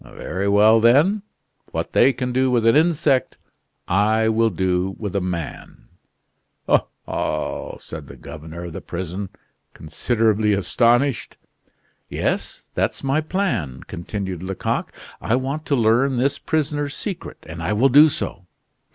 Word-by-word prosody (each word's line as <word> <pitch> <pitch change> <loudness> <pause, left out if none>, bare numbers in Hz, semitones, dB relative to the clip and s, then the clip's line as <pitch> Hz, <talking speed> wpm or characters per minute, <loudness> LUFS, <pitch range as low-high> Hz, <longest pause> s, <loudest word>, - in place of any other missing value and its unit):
Very 100 +2 -2
well, 105 +3 +6
then. 145 - +4 0.5
What - - -3
they 135 - +5
can 125 -1 -3
do 130 +1 +2
with 120 -3 +2
an 115 - +5
insect, 150 -4 +2 0.5
I 110 +4 +2
will 115 +1 +3
do 95 0 -1
with 100 -3 -5
a 100 - +1
man!" 85 -4 -6 0.8
"Oh, - - +3 0.2
ho!" - - -3
said - - -9
the - - -11
governor 80 +2 -9
of 85 -2 -7
the - - -6
prison, 95 +2 -5 0.5
considerably 110 +5 +1
astonished. 120 +7 +1 0.7
"Yes; - - -3
that's - - -1
my 135 +3 +1
plan," 120 - -2
continued 95 0 -5
Lecoq. 95 0 -2 0.3
"I 115 - +1
want 135 +5 -3
to 140 - +2
learn 120 +3 +3
this 135 +3 +1
prisoner's 145 -2 -1
secret; 195 -5 -6
and 85 +1 -7
I 85 - -1
will 125 +6 +4
do 150 +4 +7
so. 90 -9 -5
110 Hz, 140 wpm, -22 LUFS, 95-135 Hz, 0.8 s, do